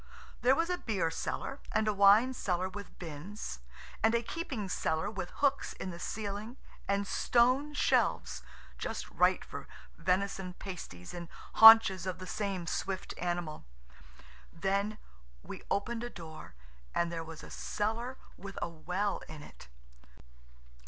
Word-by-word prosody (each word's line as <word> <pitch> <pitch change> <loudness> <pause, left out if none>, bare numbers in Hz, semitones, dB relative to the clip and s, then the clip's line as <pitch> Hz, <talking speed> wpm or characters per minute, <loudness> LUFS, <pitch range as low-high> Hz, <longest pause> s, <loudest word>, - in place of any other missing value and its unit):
There 255 +2 +5
was 335 +3 +1
a 360 - -1
beer 185 -8 0
cellar, 270 - -3
and 215 - +1
a 215 - +3
wine 205 +6 +6
cellar 185 -6 -1
with 200 +2 -9
bins, 165 - -6 0.4
and 225 +2 +4
a 235 - +1
keeping 260 - -4
cellar 160 -1 -1
with 190 -4 -4
hooks 280 -1 0
in 190 - -5
the 170 - -8
ceiling 210 +5 -4 0.3
and 200 0 +1
stone 255 +8 +2
shelves–just - - -1
right - - +3
for - - -8 0.3
venison 185 +1 0
pasties 125 - -8
and 170 -1 -7 0.2
haunches 220 -5 +9
of 185 - -2
the 185 - -8
same 195 -2 -2
swift 190 +2 -3
animal. 175 -3 -2 0.9
Then 200 +2 -1 0.5
we - - -8
opened 230 +3 -1
a 240 - -3
door 160 - -10 0.4
and 170 0 +1
there 165 -1 -3
was 160 -1 -9
a - - -10
cellar 230 +5 -2 0.2
with 200 0 -9
a - - -1
well 180 +5 -2
in 155 -1 -9
it. - - -14
200 Hz, 140 wpm, -32 LUFS, 175-225 Hz, 0.9 s, haunches